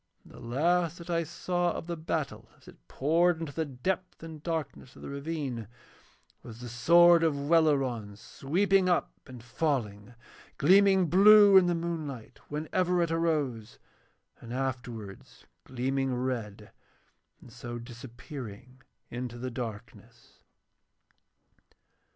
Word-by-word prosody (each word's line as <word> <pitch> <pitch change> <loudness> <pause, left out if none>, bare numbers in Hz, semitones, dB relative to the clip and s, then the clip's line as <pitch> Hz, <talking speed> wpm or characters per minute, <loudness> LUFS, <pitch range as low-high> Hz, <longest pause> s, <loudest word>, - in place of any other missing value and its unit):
And - - -17
the - - -12
last 165 +7 0
that 170 0 -8
I 170 0 +1
saw 175 +2 -2
of - - -6
the 170 0 -4
battle 145 -9 -4
as - - -24
it - - -17
poured 165 +4 +1
into 160 -3 -6
the 160 +2 -2
depth 175 +7 -4
and 160 -2 -9
darkness 155 -5 -5
of - - -13
the - - -7
ravine 140 -6 -4 0.7
was 115 -1 -11
the 120 0 -8
sword 170 +8 +5
of 160 -3 +2
Welleran 135 -10 +1
sweeping 185 - 0
up 175 - +1 0.2
and 125 -3 -11
falling, 120 -5 -3 0.4
gleaming 190 +4 +5
blue 205 +4 +7
in 185 -2 +7
the 175 - +1
moonlight 160 -8 -5
whenever 175 +4 0
it 165 - -2
arose 150 -10 -1 0.6
and 115 - -11
afterwards 125 -6 -6 0.2
gleaming 130 +1 -2
red, 115 -5 -4 0.7
and - - -16
so 120 0 -7
disappearing 120 0 -10 0.3
into 120 -1 -5
the 130 +1 -5
darkness. 115 -1 -9
140 Hz, 125 wpm, -29 LUFS, 120-170 Hz, 0.7 s, blue